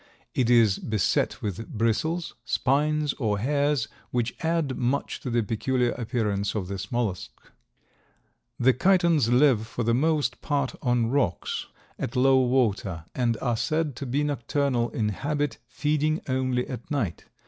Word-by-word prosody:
It 125 -2 +1
is 115 -5 +5
beset 110 -5 0
with 105 +2 -4
bristles, 160 +10 0
spines 150 +5 +1
or 105 -5 +1
hairs, 140 +2 +1 0.2
which 120 -1 -1
add 160 -5 0
much 125 +3 -1
to 130 - -5
the 120 -1 +1
peculiar 120 +3 0
appearance 110 -4 -1
of 100 -4 -2
this 95 0 -5
mollusk. 105 - -1 1.3
The 130 +2 +5
Chitons 170 -4 +3
live 125 -4 +4
for 120 - -3
the 115 +1 +2
most 150 +3 +1
part 140 -3 -1
on 120 -2 +1
rocks 130 -11 -1 0.3
at 115 - -4
low 130 +1 +5
water 110 -10 +1
and 120 -3 0
are 120 -3 +1
said 155 +3 -1
to 140 - -5
be 140 +4 0
nocturnal 140 -3 0
in 110 -1 -1
habit, 145 +6 -2
feeding 150 +5 0
only 130 -1 0
at 125 0 -7
night. 125 - -2
125 Hz, 145 wpm, -26 LUFS, 115-145 Hz, 1.3 s, is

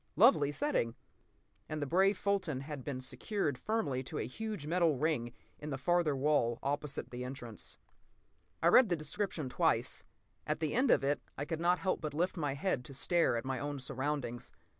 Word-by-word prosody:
Lovely 180 - +6
setting! 145 - 0 0.7
And 155 - -3
the 145 - -1
brave 190 +6 +3
Fulton 185 -9 0
had 140 -2 -6
been 130 -2 -4
secured 145 +3 -2
firmly 140 - -1
to - - -5
a - - -1
huge 210 - -5
metal 165 -2 +2
ring 150 -5 +1
set 120 - -13 0.3
in 150 - -4
the 135 - -2
farther 175 0 +2
wall, 130 -4 +2
opposite 145 0 -2
the 125 0 -5
entrance. 125 -4 -4 0.9
I 170 - +6
read 235 +4 +7
the 175 - +3
description 155 0 -3
twice. 125 - +1 0.4
At - - 0
the 155 -2 -1
end 255 +2 +3
of - - +5
it 145 +2 +1 0.2
I 145 - -2
could 165 +1 -3
not 175 +1 +4
help 185 0 -1
but 150 -2 -4
lift 175 +4 +1
my 145 -5 -1
head 140 -4 0
to 135 - -9
stare 165 -3 +2
at 115 - -4
my 130 -1 -2
own 145 0 -3
surroundings. 130 -2 -3
150 Hz, 190 wpm, -33 LUFS, 135-175 Hz, 0.9 s, read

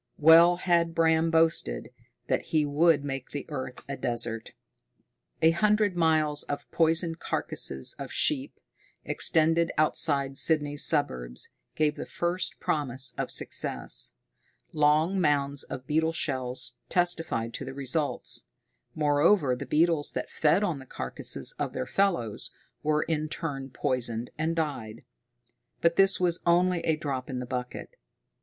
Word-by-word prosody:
Well 165 +3 +7
had 170 -2 +1
Bram 160 0 +3
boasted 160 - +1 0.3
that - - -1
he 155 -2 +1
would 145 +1 +3
make 135 -2 -5
the 145 - -6
earth 130 -4 -6
a 140 - -4
desert! 120 -3 -1 0.9
A 160 - +7
hundred 210 +2 +2
miles 155 -3 +2
of 145 - -5
poisoned 165 0 +1
carcasses 65 -1 0
of - - -6
sheep, - - -1 0.5
extended 165 +1 +2
outside 140 -3 +2
Sydney's 145 -2 +2
suburbs, 60 - 0 0.3
gave 150 -1 +1
the - - -6
first 175 +1 -2
promise 130 -4 -1
of - - -3
success. - - -2 0.6
Long 155 +5 +2
mounds 140 -3 +1
of 130 - -7
beetle 160 +3 +1
shells 125 -5 -2
testified 165 -10 0
to - - -5
the 135 0 -8
results; 140 - -2 0.5
moreover, 150 -1 +3
the 125 - -7
beetles 160 -1 +2
that - - -4
fed 165 +6 +2
on 170 -8 -1
the 135 - -13
carcasses - - -2
of - - -2
their - - -3
fellows, 170 - -1 0.3
were 150 0 +1
in 155 -1 -2
turn 140 -5 -5
poisoned 120 -2 -3
and 160 +2 -1
died. 135 -9 -4 0.8
But 170 0 +2
this 195 0 +5
was 180 -1 +1
only 180 +1 +3
a 160 -1 0
drop 140 -4 -4
in 130 - -4
the 125 - -4
bucket. 125 - -6
150 Hz, 135 wpm, -27 LUFS, 135-165 Hz, 0.9 s, Well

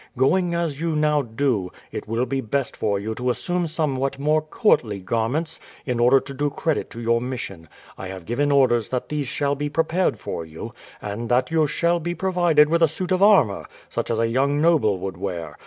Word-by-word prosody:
Going 170 +6 +2
as 165 -4 -2
you 165 -2 0
now 150 -1 +2
do, 115 -6 -1 0.2
it - - -6
will 115 +3 0
be 135 0 -2
best 130 +2 -2
for 100 -1 0
you 105 +3 -3
to 125 +3 -2
assume 175 +7 -1
somewhat 140 -5 -1
more 150 +2 +2
courtly 150 - +1
garments 115 - -2 0.3
in 125 -3 -1
order 125 +3 +5
to 140 - -9
do 145 +2 -1
credit 155 +1 -2
to 115 - -9
your 115 0 +1
mission. 100 -10 -6 0.3
I 95 - -5
have 95 -2 -8
given 145 +7 0
orders 125 -5 +3
that 125 -1 -3
these 150 -3 -2
shall 140 +2 0
be 145 +1 -3
prepared 165 +4 +1
for 85 - -5
you, 80 0 -9 0.3
and 105 +3 -4
that 125 +3 +2
you 160 -2 +3
shall 170 +4 +1
be 175 +1 -3
provided 175 -5 +3
with 170 +2 +1
a 165 - +6
suit 175 +4 -5
of 185 0 +2
armour, 195 - +4 0.2
such - - -3
as 115 - 0
a 115 0 +2
young 140 +5 +1
noble 150 - +3
would 95 0 -5
wear. 85 -5 -5
135 Hz, 205 wpm, -23 LUFS, 115-160 Hz, 0.3 s, a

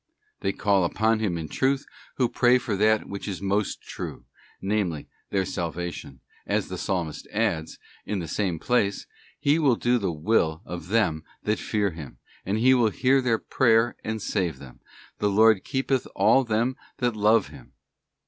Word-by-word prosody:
+ - - -43
They 95 - 0
call 100 -1 +2
upon 110 +5 +1
Him 100 -6 -1
in 80 -1 -5
truth 135 - 0 0.3
who 125 - +3
pray 125 +1 +4
for 120 -4 -2
that 110 +2 +2
which 100 +1 -6
is 95 -4 -4
most 100 +1 -1
true, - - -7 0.3
namely, 95 -6 -1 0.2
their 95 -1 0
salvation, 85 -6 -5 0.3
as - - 0
the - - -5
Psalmist 85 -5 -3
adds, 100 -8 -1 0.3
in 105 - -3
the 85 -3 -4
same 90 0 -1
place, 100 0 0 0.2
' - - -29
He 150 +3 +5
will 140 -6 +4
do 120 +1 +1
the 95 -4 -1
will 80 0 +1
of 85 -2 -7
them 90 -7 +1 0.2
that 105 +1 0
fear 105 -3 0
Him, 75 -7 -10 0.3
and 100 +2 +1
He 130 +4 +5
will 120 -4 +4
hear 135 +5 +2
their 120 -3 +2
prayer 115 -1 +2
and 110 0 -3
save 95 -5 -1
them. 65 -3 -13 0.4
The 105 - +2
Lord 110 0 +5
keepeth 135 -1 -1
all 110 +7 +4
them 115 +3 0 0.2
that 120 -2 0
love 105 +1 +3
Him. - - -14
105 Hz, 175 wpm, -25 LUFS, 90-115 Hz, 0.4 s, He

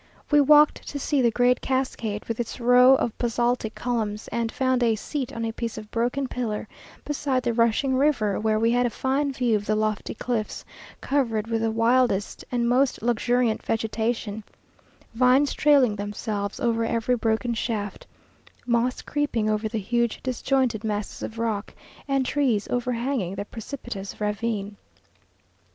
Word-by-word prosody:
We 295 0 +6
walked 295 +1 +5
to 290 - -4
see 285 0 0
the 240 - +4
great 245 +2 +2
cascade, 245 -5 -2
with 230 0 -4
its 240 +2 -4
row 250 +2 +6
of 235 -4 -1
basaltic 240 -1 0
columns, 220 -3 -2
and 230 -1 -2
found 260 -2 +1
a 230 -2 +3
seat 265 +4 -4
on 230 0 -4
a 225 - -2
piece 230 -1 -4
of 215 0 -9
broken 245 +4 0
pillar 225 -4 -3 0.4
beside 275 -3 -1
the 240 -1 0
rushing 235 +3 +2
river, 255 -8 +2
where 215 0 +1
we 230 +1 +2
had 245 +1 +2
a - - -1
fine 275 +4 0
view 250 -4 +1
of 205 -1 -3
the 215 - +2
lofty 215 -1 -1
cliffs, 225 -2 -3 0.4
covered 230 -7 0
with 225 -1 -1
the 225 - +1
wildest 230 -2 +1
and 240 -1 +1
most 250 -1 +2
luxuriant 240 -1 +1
vegetation: 225 -1 -2 0.7
vines 255 +4 +4
trailing 275 -7 +4
themselves 205 0 -4
over 230 -3 +1
every 230 +2 +1
broken 225 +1 0
shaft; 215 -3 -3 0.6
moss 240 +1 0
creeping 240 -8 0
over 215 +1 -1
the 225 - -3
huge 235 +3 0
disjointed 255 -3 0
masses 210 -1 -3
of 225 - -6
rock; 220 -2 -2 0.3
and 275 -1 +1
trees 250 -7 +1
overhanging 245 -5 -1
the 200 +1 -4
precipitous 225 -4 -7
ravine. 210 -1 -2
235 Hz, 155 wpm, -25 LUFS, 220-255 Hz, 0.7 s, We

